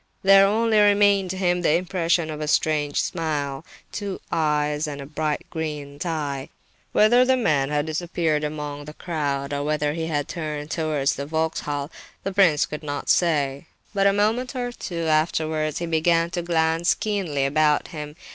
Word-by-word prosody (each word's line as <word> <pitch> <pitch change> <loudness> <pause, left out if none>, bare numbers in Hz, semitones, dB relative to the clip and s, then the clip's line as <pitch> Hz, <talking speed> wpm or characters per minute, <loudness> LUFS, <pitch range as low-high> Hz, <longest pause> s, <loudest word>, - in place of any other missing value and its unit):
There 195 0 +7
only 220 +1 +2
remained 205 -2 +4
to 190 - -3
him 180 -1 +1
the 160 -2 +3
impression 170 -2 0
of 155 0 -6
a 150 - -2
strange 150 -1 +1
smile, 150 -4 -2 0.3
two 200 -2 -4
eyes, 150 -1 0
and 145 -1 -6
a 140 - -7
bright 155 +2 -2
green 150 -3 -5
tie. 145 -5 -3 0.4
Whether 240 +4 +5
the 260 0 +3
man 145 - +1
had 150 0 0
disappeared 160 -1 -1
among 150 -1 -5
the 150 +1 -10
crowd, 145 -5 -3
or 145 0 -1
whether 150 0 0
he 160 0 -3
had 145 -3 -1
turned 150 -2 -5
towards 155 -4 0
the 140 +1 -4
Vauxhall, 155 -2 -2 0.3
the 195 - -3
prince 180 -7 +4
could 150 - -7
not 145 -2 -5
say. 145 -4 +1 0.3
But 200 -1 +3
a - - +5
moment 225 +6 0
or 245 -1 -2
two 170 -8 -5
afterwards 155 -1 0
he 170 - -2
began 165 +1 +2
to 175 - -2
glance 165 0 +1
keenly 185 -10 -1
about 150 +1 +2
him. 150 -3 -7
160 Hz, 170 wpm, -23 LUFS, 150-180 Hz, 0.4 s, There